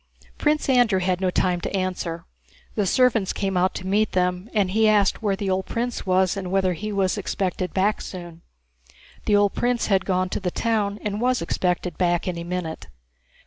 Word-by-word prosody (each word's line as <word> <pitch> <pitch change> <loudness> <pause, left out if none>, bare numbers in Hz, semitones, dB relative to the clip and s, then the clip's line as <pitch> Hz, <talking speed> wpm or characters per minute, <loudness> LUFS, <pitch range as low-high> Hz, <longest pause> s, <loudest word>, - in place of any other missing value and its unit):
Prince 300 0 +1
Andrew 245 -7 +4
had 185 0 0
no 185 - +2
time 180 -1 +1
to - - -3
answer. 180 -3 -3 0.5
The 205 -3 0
servants 230 -4 +3
came 195 -1 -2
out 185 +1 +2
to 185 - -5
meet 205 +3 +1
them, 180 +2 0
and 200 -4 +1
he 220 +2 +4
asked 205 -1 +3
where 205 -3 +1
the 195 -1 -2
old 190 0 -1
prince 235 -3 -3
was 185 0 +3
and 190 -2 -4
whether 190 -1 +2
he 210 +5 -5
was 195 0 0
expected 185 -2 -2
back 200 +3 +1
soon. 175 -3 -8 0.9
The 210 - +4
old 205 -1 +3
prince 245 -1 0
had 190 0 +2
gone 185 -1 0
to - - -2
the 190 -3 -1
town 210 0 0
and 210 +1 -2
was 250 +1 +2
expected 180 0 -1
back 175 -1 +1
any 170 -2 -3
minute. 170 - -4
190 Hz, 190 wpm, -24 LUFS, 180-210 Hz, 0.9 s, Andrew